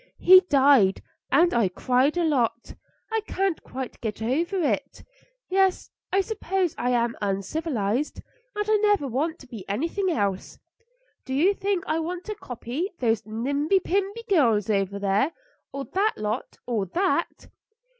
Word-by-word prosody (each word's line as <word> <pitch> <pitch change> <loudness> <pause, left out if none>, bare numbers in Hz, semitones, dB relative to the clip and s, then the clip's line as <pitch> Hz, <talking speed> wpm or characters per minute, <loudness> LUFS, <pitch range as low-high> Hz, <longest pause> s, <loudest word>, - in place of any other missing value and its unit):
He 370 +1 +8
died, 270 -9 +4 0.3
and 345 +1 +4
I 230 -5 +2
cried 255 - +1
a 350 - +2
lot. 240 -7 0 0.4
I 445 0 +1
can't 385 -3 -1
quite 260 -1 -7
get 215 -3 -4
over 325 - -1
it. - - -2 0.4
Yes, 380 0 +1 0.2
I 390 - +3
suppose 385 -4 -1
I 245 - -1
am 235 -1 +1
uncivilised, 210 - -2 0.4
and 415 0 -1
I 430 0 +4
never 415 -8 +2
want 300 +7 -1
to 265 - -15
be 225 -5 -8
anything 335 - -1
else. 200 - -2 0.7
Do 260 - -4
you 355 +8 +4
think 395 -2 -1
I 315 +1 0
want 350 +2 -4
to 430 - -5
copy 270 - -5
those 225 -3 +1
nimby 285 - +1
pimby 395 +5 -2
girls 230 - +3
over 200 -1 0
there, 200 +10 +1 0.4
or 275 0 -5
that 410 +3 0
lot, 215 +3 -4
or 220 -6 -1
that?" 370 - -1
280 Hz, 150 wpm, -25 LUFS, 225-370 Hz, 0.7 s, He